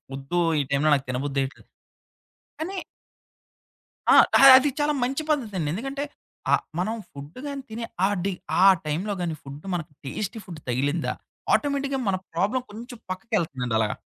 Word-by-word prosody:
వద్దు 135 +6 -2 0.2
ఈ - - 0
టైంలో 140 +2 +3
నాకు 135 -1 -3
తినబుద్దెయ్యట్లేదు. 135 +1 -2 0.9
కానీ 370 +5 -3 1.4
ఆ! - - +8 0.4
అది 265 +3 +3
చాలా 295 0 +2
మంచి 270 +5 -1
పద్ధతండి. 210 - -1
ఎందుకంటే 270 +8 -3 0.5
ఆహ్, - - +3 0.2
మనం 215 +5 0 0.2
ఫుడ్డుగాని 255 - -7
తినే 230 +1 -4 0.2
ఆహ్, 205 +1 +1
డి 200 - 0 0.3
ఆ - - +8 0.2
టైంలోగాని 175 +2 -2
ఫుడ్డు 140 +4 -10
మనకు 170 -2 -3
టేస్టీ 205 - -4
ఫుడ్ 170 -5 -8
తగిలిందా 145 +6 0 0.4
ఆటోమేటిక్‌గా 280 -1 +1
మన 195 - +2 0.2
ప్రాబ్లమ్ 210 +9 0
కొంచెం 240 +4 -9
పక్కకెళ్తుందండి 170 - -2
అలాగా. 105 -1 0
185 Hz, 130 wpm, -25 LUFS, -, 1.4 s, ఆ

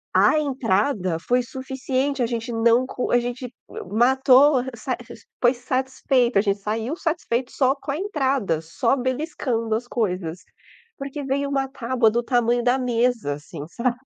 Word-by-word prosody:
a 310 - +5
entrada 215 - 0
foi 245 +8 +1
suficiente. 265 +1 -2
A - - +3
gente 235 +1 -3
não 230 +2 +3
co 250 - -3
a 245 - +5
gente 245 +1 -4 0.2
m - - -7
matou 265 +4 +5
a - - 0
r 260 - -5
sa 255 +3 -3
r 245 0 -8
r - - -13 0.2
foi 245 +1 +5
satisfeito, 255 -2 0
a - - +5
gente 200 -1 0
saiu 225 +8 -2
satisfeito 285 -8 -2
só 265 0 +2
com 275 - -6
a 280 - -2
entrada, 270 - 0
só 165 +11 0
beliscando 255 -4 -2
as 235 +2 -3
coisas, 180 -8 -2 0.6
porque 275 +1 -5
veio 280 +1 -1
uma 270 -1 0
tábua 245 -3 +1
do 235 +2 0
tamanho 240 -1 +1
da 250 +2 +3
mesa 240 - 0
assim, 145 +1 -9
sabe. 240 +5 -1
245 Hz, 175 wpm, -23 LUFS, 230-265 Hz, 0.6 s, a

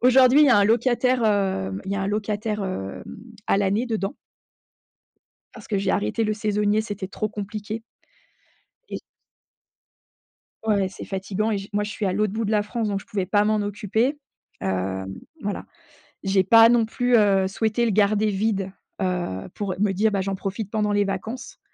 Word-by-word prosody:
Aujourd'hui 255 +3 +6
il 300 - +7
y - - +5
a 245 - +6
un 205 - +5
locataire, 240 +3 +2
hem 190 - 0
il 195 - -3
y - - 0
a - - -1
un - - -1
locataire 210 0 -2
hem, 100 - -5 0.4
à - - +3
l'année 205 +4 +1
dedans 220 0 -2 1.4
parce 225 - -12
que 205 - 0
j'ai 195 - 0
arrêté 105 - 0
le 215 - +1
saisonnier, 210 0 +1
c'était 205 -3 -5
trop 215 +3 -3
compliqué 210 +1 -5 1.1
et - - -5 1.7
Ouais, 200 -3 +2
c'est - - -9
fatigant 195 +3 -2
et 215 - +1
je 195 +1 -8
moi 205 0 0
je 210 - -5
suis 215 - -4
à 190 - +1
l'autre 210 +1 0
bout 225 +1 -1
de 210 - -1
la 210 -1 +3
France 220 +1 -2
donc 200 -1 -1
je - - -16
pouvais 210 -5 -2
pas 205 +2 +3
m'en 215 +1 +2
occuper. 215 +7 0 0.4
Heu, 95 0 -1 0.4
voilà, 205 -1 -3 0.6
j'ai 195 -1 +3
pas 225 +4 +8
non 235 -1 +4
plus, 245 +2 +1
heu, 200 -3 +4
souhaitée 220 +4 0
le 230 - +1
garder 210 +1 +3
vide, 195 -1 -1 0.3
heu, 180 - -2
pour 200 -3 -3
me 200 -1 +2
dire: 215 +3 +2
«Bah 200 - 0
j'en 195 +1 -1
profite 195 +2 -4
pendant 210 -1 0
les 205 0 +2
vacances». 215 +6 -5
205 Hz, 185 wpm, -24 LUFS, 195-220 Hz, 1.7 s, pas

